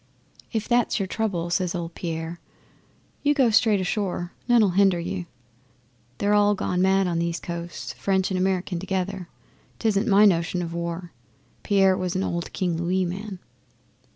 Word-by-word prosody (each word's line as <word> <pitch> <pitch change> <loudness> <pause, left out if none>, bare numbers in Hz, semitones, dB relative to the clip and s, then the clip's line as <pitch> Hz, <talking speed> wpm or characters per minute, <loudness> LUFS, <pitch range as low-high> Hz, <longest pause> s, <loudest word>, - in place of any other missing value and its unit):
'"If 220 -2 -2
that's 240 -2 +2
your 195 - 0
trouble," 185 -4 -2
says 180 0 0
old 170 -1 -4
Pierre, 165 0 -5 0.8
"you 290 0 +2
go 260 -5 +4
straight 215 -1 +4
ashore. 185 -2 -2
None'll 230 -5 +5
hinder 190 -1 +3
you. 175 +1 -4 0.9
They're 205 +1 +1
all 205 0 +4
gone 180 -1 -1
mad 190 +1 +3
on 170 -2 0
these 170 -1 -1
coasts 170 0 -6
French 190 -1 0
and 185 - 0
American 185 -1 0
together. 190 -1 -3 0.5
'Tisn't 220 0 +1
my 205 0 +6
notion 175 -1 +2
o' - - -2
war." 170 +1 -4 0.5
Pierre 195 -2 +3
was 185 -1 -2
an 190 - 0
old 170 -2 -3
King 175 -3 -1
Louis 180 +2 0
man. 190 +3 -5
185 Hz, 155 wpm, -25 LUFS, 175-200 Hz, 0.9 s, my